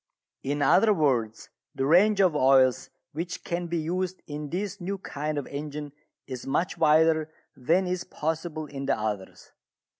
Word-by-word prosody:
In 145 +1 -1
other 210 +6 +5
words, 125 - 0 0.3
the 135 - -1
range 195 +7 +5
of 180 -5 +3
oils 130 -2 +4 0.2
which 170 +4 -5
can 175 0 -3
be 170 0 -2
used 180 +3 -3
in 150 0 -6
this 195 +3 -4
new 195 +3 -3
kind 150 -4 -4
of 145 - -2
engine 145 0 -6 0.3
is 130 -1 -7
much 155 +7 0
wider 160 0 +3 0.3
than 165 +9 +1
is 180 0 -2
possible 160 0 -3
in 140 -2 -6
the - - +2
others. 105 -3 -5
155 Hz, 155 wpm, -27 LUFS, 140-175 Hz, 0.3 s, other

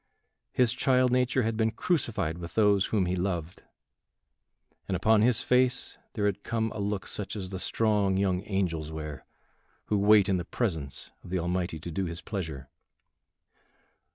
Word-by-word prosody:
His 125 -2 +3
child 125 0 +3
nature 125 0 +2
had 110 0 0
been 110 0 +2
crucified 110 - -1
with 85 -1 -8
those 105 -3 +4
whom 100 -4 +1
he 90 +1 0
loved, 90 -2 -3 1.3
and 95 - -1
upon 110 +3 +4
his 120 0 +4
face 125 0 +1
there 105 - -1
had 100 0 0
come 110 -1 -1
a - - -6
look 100 -2 -2
such 105 0 -4
as 95 -3 -5
the 95 - -4
strong 105 -3 +1
young 95 -2 +1
angels 85 -6 -1
wear 75 -4 -7 0.6
who 105 - +1
wait 105 -1 +6
in 95 -2 +2
the 90 - -2
presence 80 - -3
of - - -11
the 95 - 0
Almighty 90 -1 -2
to 85 +3 -7
do 95 +4 -1
his 85 0 -4
pleasure. 80 - -5
100 Hz, 165 wpm, -28 LUFS, 85-110 Hz, 1.3 s, wait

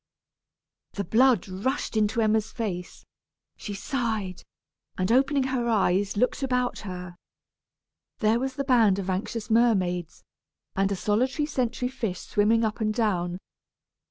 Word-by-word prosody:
The 200 - -2
blood 230 +2 +3
rushed 210 +9 -2
into 215 +2 +2
Emma's 220 0 +1
face; 185 -7 -5 0.5
she 205 - -6
sighed, 220 -5 -2 0.6
and 185 +3 0
opening 270 +2 +3
her 260 -2 -1
eyes, 200 -2 +1
looked 250 +5 +1
about 250 -2 0
her. 180 -3 -7 1.0
There 220 +2 +2
was 265 +1 -3
the 275 - -1
band 230 -8 +4
of 190 -1 -2
anxious 215 +4 -3
mermaids, 185 -7 +1 0.5
and 195 +1 +1
a - - +1
solitary 255 - 0
sentry 250 -4 -1
fish 225 -8 -4
swimming 225 +2 +2
up 220 +1 -3
and 215 0 +1
down. 185 -6 0
220 Hz, 130 wpm, -26 LUFS, 195-250 Hz, 1.0 s, band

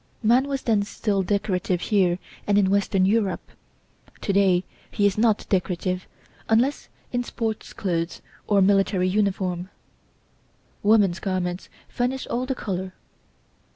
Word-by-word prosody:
Man 245 +5 +4
was 275 -1 -3
then 220 -3 +2
still 200 0 -1
decorative 185 -2 0
here 185 -4 +2 0.3
and 205 -1 +3
in 195 -2 +3
western 200 -1 +2
Europe. 205 -1 0 0.7
To 200 - -1
day 190 -2 +4 0.3
he 205 - 0
is 200 -1 +3
not 220 -1 +2
decorative, 185 -1 -1 0.4
unless 245 +6 +2 0.2
in 245 0 0
sports 225 -2 -4
clothes 170 -3 -2 0.3
or 200 -2 +4
military 195 -1 +3
uniform; 185 -2 0 1.1
woman's 205 -4 +4
garments 185 -1 -3 0.2
furnish 255 +1 -2
all 250 +2 -2
the 265 - -1
colour. 185 -4 -4
200 Hz, 125 wpm, -24 LUFS, 185-220 Hz, 1.1 s, Man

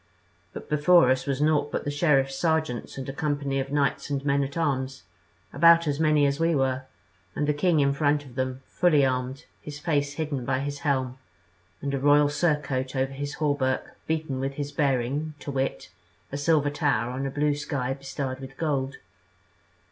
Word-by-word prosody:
But - - -9
before 150 -1 +5
us 130 +1 0
was 140 0 -1
naught 150 -1 +2
but - - -2
the 145 - -2
sheriffs' 140 -3 +2
sergeants 160 -6 -1
and 135 - -5
a 135 - -4
company 140 -2 -1
of 135 +1 -4
knights 145 0 0
and 140 -1 -2
men 140 0 +2
at 140 +3 -5
arms, 135 - -1 0.5
about 170 +3 +6
as 145 0 -1
many 155 -2 +4
as 140 +1 0
we 165 0 +2
were, 130 -1 0 0.5
and 150 - 0
the 150 - +2
king 160 +2 +2
in 140 0 +3
front 145 0 +1
of 130 - -13
them, 130 0 -3
fully 155 -6 +3
armed, 130 +1 -2 0.2
his 150 -1 -8
face 145 -3 0
hidden 145 -4 -3
by 130 - 0
his 145 0 -4
helm, 130 -3 -1 0.6
and 140 0 -2
a 140 - 0
royal 145 +1 +5
surcoat 145 -4 -1
over 135 +1 0
his 145 +1 -5
hauberk 145 -4 -1
beaten 155 -4 -2
with 135 +1 -2
his 145 0 -4
bearing, 140 +2 0
to 145 - -6
wit, 135 -8 -2 0.4
a 140 - -3
silver 145 0 +2
tower 135 -6 0
on 135 +2 -3
a - - -2
blue 145 +2 +1
sky 140 -3 -2
bestarred 135 -1 -5
with 135 0 -10
gold. 140 -4 -1
140 Hz, 185 wpm, -26 LUFS, 135-150 Hz, 0.6 s, about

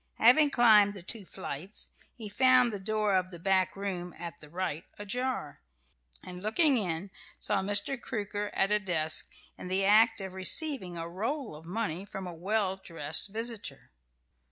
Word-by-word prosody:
Having 270 +6 +6
climbed 215 -6 +5
the 190 - -8
two 210 +1 -4
flights, 180 +5 -7 0.3
he 225 -4 -7
found 250 +2 +4
the 205 - -4
door 210 +1 0
of 185 0 +1
the 175 - -8
back 190 +1 +1
room 185 -3 -4
at 170 0 -7
the 150 - -12
right 170 -1 -3
ajar, 250 - -3 0.6
and 180 0 -8
looking 270 - +3
in, 190 -3 -2 0.3
saw 205 -2 0
Mr. 205 +6 0
Crooker 205 -1 -3
at 195 +1 +2
a 210 - +4
desk, 160 -5 0 0.3
in - - -7
the 190 +1 +1
act 215 +3 +5
of 190 -1 -6
receiving 190 - +1
a 165 0 -4
roll 225 - -3
of 155 +2 -12
money 185 -2 -3
from 195 -1 -7
a 180 - -6
well 190 +2 0
dressed 165 -2 -2
visitor. 220 - -5
195 Hz, 165 wpm, -30 LUFS, 180-220 Hz, 0.6 s, Having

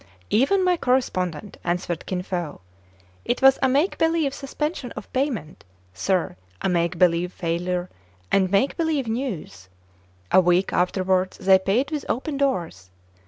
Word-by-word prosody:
"Even 325 - +3
my 360 -1 +3
correspondent," 205 - -1
answered 175 -1 -2
Kin 180 -1 -2
Fo. 175 - -4 0.6
"It 245 - -1
was 270 0 +7
a 265 - +3
make 290 +8 +1
believe 325 -4 +2
suspension 280 -1 -4
of - - -10
payment, 255 - -2 0.3
sir, 180 - -1 0.2
a - - -1
make 170 -1 0
believe 175 0 +3
failure, 175 +1 -2 0.4
and 190 -1 +3
make 200 +8 +2
believe 315 -6 0
news. 200 - -4 0.6
A 185 - +7
week 180 +1 +2
afterwards 185 +1 +1
they 190 0 +5
paid 225 +10 0
with 300 -2 -3
open 280 +4 -2
doors. 175 - -1
190 Hz, 140 wpm, -24 LUFS, 175-270 Hz, 0.6 s, was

